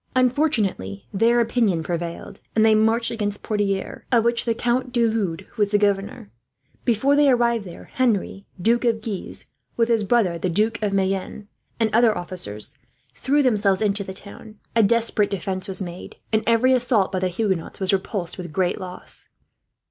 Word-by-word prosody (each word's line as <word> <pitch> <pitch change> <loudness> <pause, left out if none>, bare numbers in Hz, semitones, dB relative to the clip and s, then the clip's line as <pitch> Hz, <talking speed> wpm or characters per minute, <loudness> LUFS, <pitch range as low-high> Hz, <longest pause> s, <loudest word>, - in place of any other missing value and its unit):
Unfortunately 235 - 0
their 230 +4 +3
opinion 225 -8 +1
prevailed, 170 0 -5 0.2
and 220 0 +4
they 220 - +6
marched 225 +2 +2
against 205 -3 -3
Poitiers, 200 -2 -2
of 235 -3 +4
which 235 0 +1
the 230 -1 +1
Count 250 +2 0
de 240 -1 +2
Lude 205 -8 -1
was 205 -2 +2
the 205 - +3
governor. 200 - -1 0.5
Before 265 +4 +3
they 290 -1 +5
arrived 235 -4 +2
there 175 - -10
Henry, 210 -5 -1
Duke 230 +7 +2
of 225 -2 +1
Guise, 210 -5 -5 0.3
with 230 0 +2
his 225 -2 +2
brother 195 -6 +2
the 185 - -1
Duke 215 +6 0
of 210 -2 0
Mayenne, 195 +1 -2 0.3
and 225 -2 +1
other 225 -1 +4
officers, 175 - -5 0.3
threw 285 +2 +1
themselves 205 -6 +2
into 205 -1 0
the 190 - -7
town. 200 +3 -12 0.2
A 230 - +5
desperate 225 -1 +2
defence 190 -1 -3
was 190 0 -2
made, 175 0 -8 0.2
and 220 - +3
every 235 +3 +4
assault 235 -6 +2
by 190 - -1
the 185 - 0
Huguenots 185 -2 -2
was 190 0 +1
repulsed, 190 -2 -2
with 175 -3 -6
great 180 +3 0
loss. 185 -1 -8
210 Hz, 170 wpm, -23 LUFS, 190-235 Hz, 0.5 s, they